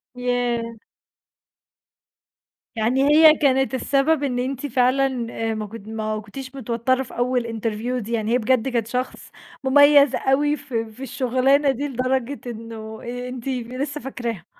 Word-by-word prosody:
ياه! 245 -2 -1 2.0
يعني 240 +5 +1
هي 310 +1 +8
كانت 270 -2 +2
السبب 275 +3 +1
إن 250 -3 -1
أنتِ 265 +2 -3
فعلًا 255 -1 +1
آآ 225 0 -2
ما 215 -1 -4
كن 220 +1 -9
ما 215 -1 -2
كُنتيش 265 +4 -9
متوترة 255 +1 0
في 250 - -12
أول 245 0 +1
interview 230 +2 -3
دي 220 +2 -7
يعني 220 -1 -1
هي 245 - +5
بجد 250 +1 +1
كانت 235 -3 -1
شخص 250 +2 -4 0.3
مميز 285 +1 +6
أوي 290 +2 +2
ف 265 - -13
في 225 +2 -3
الشغلانة 265 +3 +2
دي 280 +3 -3
لدرجة 260 +1 -1
إنه 220 -1 -8
أنتِ 245 +1 -6
لسه 260 +3 -3
فاكراها؟ 235 -8 -5
250 Hz, 140 wpm, -22 LUFS, 230-270 Hz, 2.0 s, هي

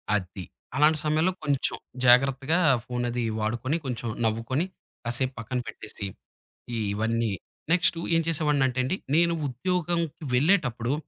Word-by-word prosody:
అది. 95 -1 -3 0.3
అలాంటి 150 +3 +5
సమయంలో, 155 +4 +2
కొంచెం 140 -3 +1 0.3
జాగ్రత్తగా 135 +6 +4 0.3
ఫోనది 120 -1 -2 0.2
వాడుకొని, 120 +8 -1
కొంచెం 120 -2 -3 0.2
నవ్వుకొని, 115 +8 0 0.4
కాసేపు 120 +2 -1
పక్కన 125 +3 -3
పెట్టేసి, 105 -2 -6 0.9
ఇవన్నీ 115 +1 0 0.4
నెక్స్ట్ 175 -1 +3 0.2
ఏం 165 - +4
చేసేవాడినంటే 145 -5 +2
అండి, 130 +8 0 0.2
నేను 170 +1 +4
ఉద్యోగంకి 170 +3 -1
వెళ్ళేటప్పుడు, 125 - +2
130 Hz, 110 wpm, -27 LUFS, 120-155 Hz, 0.9 s, అలాంటి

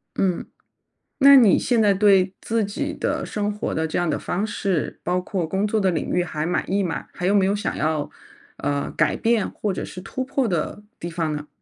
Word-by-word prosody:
嗯， 185 -3 0 0.7
那 280 +1 +9
你 230 -8 +7
现 240 -3 +2
在 205 -2 +4
对 195 -2 +4
自 225 -1 0
己 200 - -3
的 - - -2
生 210 -1 -2
活 210 - -3
的 160 0 0
这 155 - -3
样 175 -2 +1
的 - - 0
方 200 +4 -2
式， 195 -6 -2
包 180 +1 0
括 180 -2 -2
工 190 +5 0
作 220 +1 +1
的 190 -2 +2
领 160 - -2
域 180 - +1
还 155 -3 -3
满意吗？ 180 0 -1
还 175 - -4
有 200 +3 +3
没 195 -2 +4
有 200 - +1
想 205 - -3
要， 155 0 -1 0.5
呃， 145 -1 -2
改 - - +1
变 230 -2 +1
或 210 - -3
者 - - -4
是 185 - -9
突 260 +7 -4
破 265 -1 0
的 180 +2 -2 0.2
地 170 - -5
方 165 -3 -2
呢？ 150 0 -6
190 Hz, 240 characters per minute, -23 LUFS, 170-210 Hz, 0.7 s, 那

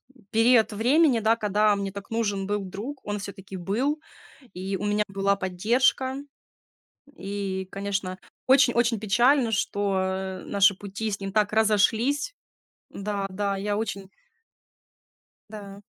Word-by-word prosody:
м, 220 - -22
период 225 0 +4
времени, 255 +3 +3
да, 220 +1 +3
когда 210 -1 +2
мне 200 -1 -3
так 200 0 -9
нужен 205 -4 -1
был 205 0 -1
друг, 220 +9 -6
он 205 0 -3
всё-таки 195 -1 -8
был, 250 - -1 0.6
и 190 +2 -3
у 205 - -5
меня 210 0 +1
была 195 0 +1
поддержка. 235 +8 +1 1.0
И, 195 -1 -4
конечно, 195 -2 -3 0.3
очень-очень 245 -4 +4
печально, 240 +4 +3
что, 200 -2 0
э, 190 0 -3
наши 200 0 +4
пути 205 +3 -5
с 200 - -4
ним 195 0 -5
так 210 0 +2
разошлись. 220 - +2 0.6
Да, 200 0 -3
да, 200 +1 -1
я 205 +1 -2
очень 200 -3 -4 1.4
Да. 200 -2 -9
205 Hz, 130 wpm, -26 LUFS, 195-225 Hz, 1.4 s, период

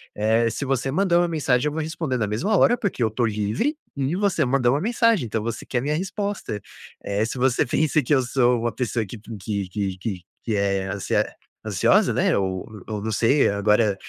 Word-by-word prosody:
eh, 110 +2 +2
se 115 +5 -4
você 135 0 0
mandou 175 +2 +3
uma 175 - +2
mensagem, 145 -5 +1
eu 150 - -2
vou 160 - -2
responder 155 -4 -2
na 110 -3 0
mesma 165 - 0
hora, 240 - +4
porque 195 - -1
eu 110 - +2
tô 120 +2 0
livre 110 - -1 0.2
e 140 +4 0
você 190 -7 +1
mandou 125 -1 +2
uma 145 - 0
mensagem, 230 - +2
então 110 -1 -2
você 115 0 -4
quer 120 - -1
minha 150 +3 -1
resposta, 195 - -3 0.4
eh, 100 +2 0
se 115 - -5
você 130 +2 +2
pensa 155 +4 +2
que 135 - +1
eu 130 - +3
sou 125 -1 +2
uma 120 0 0
pessoa 115 0 -2
que 105 - -9
que 105 -2 -4
que 95 -1 -3
que 95 -2 -4 0.2
que 110 - -1
é 100 -1 0
ansia 100 0 0 0.4
ansiosa, - - +3
né, - - +2
ou 95 -1 -2 0.2
ou 105 -2 -4
não 110 - -2
sei 135 +7 +3
agora 105 0 +2
120 Hz, 210 wpm, -23 LUFS, 105-150 Hz, 0.4 s, hora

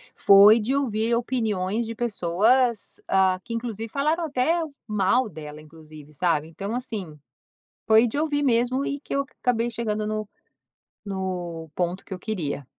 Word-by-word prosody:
foi 200 +3 +7
de 235 +5 -1
ouvir 230 -4 0
opiniões 225 -3 -1
de 225 - -5
pessoas, 230 +2 +1
ah, 190 -1 +3
que 230 - -7
inclusive 230 -1 -4
falaram 305 +6 0
até 310 +3 +1 0.3
mal 215 +3 +1
dela 150 -2 -9
inclusive, 155 -1 -14
sabe? 160 -1 0
Então, 195 +6 -6
assim, 220 -10 -5 0.7
foi 220 +1 +5
de 235 - -4
ouvir 295 -1 0
mesmo 255 +1 +1
e 280 - -2
que - - -7
eu 280 0 0 0.2
acabei 240 -1 +1
chegando 215 -2 -2
no 215 -1 -3 0.8
no 180 -4 -4
ponto 180 +1 -2
que - - -13
eu - - -7
queria. 165 -9 -4
215 Hz, 150 wpm, -24 LUFS, 185-245 Hz, 0.8 s, foi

